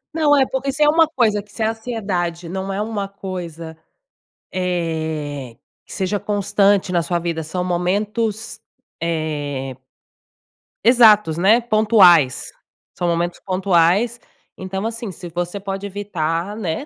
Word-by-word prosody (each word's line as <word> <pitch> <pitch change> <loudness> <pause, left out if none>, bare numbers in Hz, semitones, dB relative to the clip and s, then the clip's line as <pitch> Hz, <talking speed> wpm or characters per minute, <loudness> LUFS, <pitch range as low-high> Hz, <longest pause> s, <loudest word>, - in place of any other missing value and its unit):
Não, 305 -3 +3
é, 270 - +4
porque 265 +1 -2
se 280 - -6
é 295 - +6
uma 325 +1 +5
coisa 215 -8 +1
que 205 - -23
se 225 - -8
a 220 +1 +2
ansiedade 195 -7 -3
não 190 +2 -4
é 195 - -2
uma 210 -2 -3
coisa, 175 -5 -7 0.7
eh, 160 -7 -3 0.3
que - - -11
seja 195 +2 -1
constante 200 -1 +1
na 175 -1 +2
sua 175 +1 -1
vida, 170 -1 -3
são 170 +4 -3
momentos, 205 +5 -2 0.4
eh 145 -5 -3 1.1
exatos, 215 -9 +6
né, 200 +7 +4
pontuais, 205 - +4 0.4
são 175 - -2
momentos 170 +1 -1
pontuais. 190 +4 +2 0.4
Então 190 +2 -5
assim, 230 -2 -4
se 175 0 -9
você 175 +4 -4
pode 195 0 -5
evitar, 185 -2 -3
né, 200 - -3
190 Hz, 135 wpm, -20 LUFS, 170-215 Hz, 1.1 s, é